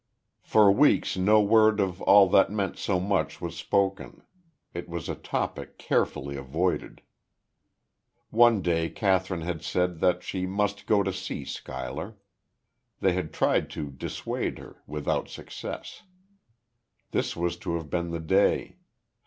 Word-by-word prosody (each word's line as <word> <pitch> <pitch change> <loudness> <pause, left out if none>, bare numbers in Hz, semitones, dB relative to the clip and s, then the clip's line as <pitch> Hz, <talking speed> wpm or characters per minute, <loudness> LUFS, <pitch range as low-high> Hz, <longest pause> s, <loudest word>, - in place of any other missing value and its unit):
For 105 -2 +5
weeks 100 - +3
no 105 +3 +4
word 110 0 +4
of 95 -2 -1
all 100 -1 +7
that 95 +2 +4
meant 100 -2 -2
so 95 -3 -1
much 90 -5 -1
was 85 -1 -5
spoken; 100 +1 -1 0.5
it 85 +1 -6
was 85 -2 -5
a - - -2
topic - - -4
carefully 70 +1 -1
avoided. 75 +7 -2 1.3
One 115 -3 +5
day 80 -1 +1
Kathryn 95 -3 0
had 85 -1 -4
said 90 -1 -1
that 90 +1 +2
she 95 -1 -3
must 100 +1 -2
go 105 -2 +4
to 95 0 -2
see 95 - -5
Schuyler. 80 - -6 0.8
They 95 - +2
had 90 -3 -3
tried - - +1
to 75 -2 -4
dissuade 65 - -4
her; - - -13
without 75 -1 -2
success. - - -8 1.1
This - - -1
was 85 0 -1
to 85 - -3
have 80 -3 -6
been 85 -1 -1
the 85 0 -3
day. 95 +5 +1
90 Hz, 140 wpm, -27 LUFS, 85-100 Hz, 1.3 s, all